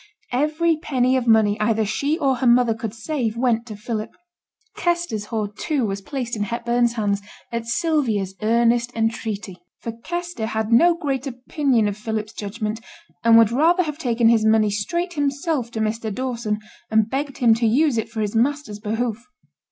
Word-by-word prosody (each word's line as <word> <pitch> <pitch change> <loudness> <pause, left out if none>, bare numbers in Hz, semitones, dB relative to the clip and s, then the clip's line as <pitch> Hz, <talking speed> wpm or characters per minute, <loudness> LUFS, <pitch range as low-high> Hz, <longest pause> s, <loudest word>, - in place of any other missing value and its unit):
Every 305 +5 +1
penny 260 -5 +1
of 250 -2 0
money 215 -2 +4
either 220 0 +2
she 285 +9 0
or 270 -6 +1
her 250 - +1
mother 240 -1 +5
could 220 -1 -5
save 235 -3 -2
went 235 -1 +1
to 215 - -7
Philip. 215 +1 -4 0.7
Kester's 345 - -1
hoard, 210 -2 -3
too, 280 +1 -1
was 195 -1 -3
placed 245 +1 -4
in 210 - -4
Hepburn's 235 +2 0
hands 205 -3 0 0.3
at 235 -1 -3
Sylvia's 235 - 0
earnest 235 +2 +2
entreaty; 220 -4 -2 0.2
for 230 - -5
Kester 345 +1 -4
had 220 0 -2
no 335 +9 +6
great 275 -4 -2
opinion 255 -2 0
of 205 - -2
Philip's 215 0 -4
judgment, 215 +1 -4 0.4
and 230 0 +7
would 225 -1 +6
rather 335 +8 +3
have 300 -2 -5
taken 235 -5 +2
his 230 -2 +4
money 220 -1 +4
straight 340 - -2
himself 285 -3 -1
to 230 - -5
Mr. 220 0 -1
Dawson, 235 -2 -2 0.3
and 220 -1 +3
begged 275 +3 -3
him 235 -3 +5
to 230 +1 +1
use 265 +1 +3
it 220 - -4
for 225 -1 -4
his 210 +1 -2
master's 255 -2 0
behoof. 225 +2 -2
235 Hz, 175 wpm, -22 LUFS, 220-270 Hz, 0.7 s, and